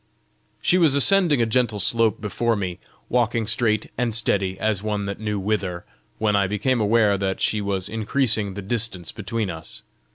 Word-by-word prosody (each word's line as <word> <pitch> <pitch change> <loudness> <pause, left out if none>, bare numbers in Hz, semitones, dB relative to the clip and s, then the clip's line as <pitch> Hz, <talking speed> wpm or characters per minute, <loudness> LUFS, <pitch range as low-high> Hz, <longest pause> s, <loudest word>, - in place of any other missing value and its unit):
She 180 - +3
was 155 -5 +4
ascending 155 -3 +4
a - - +2
gentle 115 -2 0
slope 115 -1 +3
before 115 +3 0
me, 90 -4 -4 0.3
walking 120 -2 0
straight 110 0 0
and 120 -3 0
steady 95 -4 0
as 110 -3 0
one 105 -1 -2
that 100 0 -5
knew 105 -2 -2
whither, 95 -3 -2 0.3
when 105 -1 +1
I 100 -1 +2
became 110 +5 0
aware 105 -2 +3
that 95 -1 -2
she 105 - 0
was 100 -2 -2
increasing 110 -2 0
the 100 - -6
distance 100 -5 -2
between 105 -1 -3
us. 80 -1 -9
105 Hz, 170 wpm, -23 LUFS, 100-115 Hz, 0.3 s, was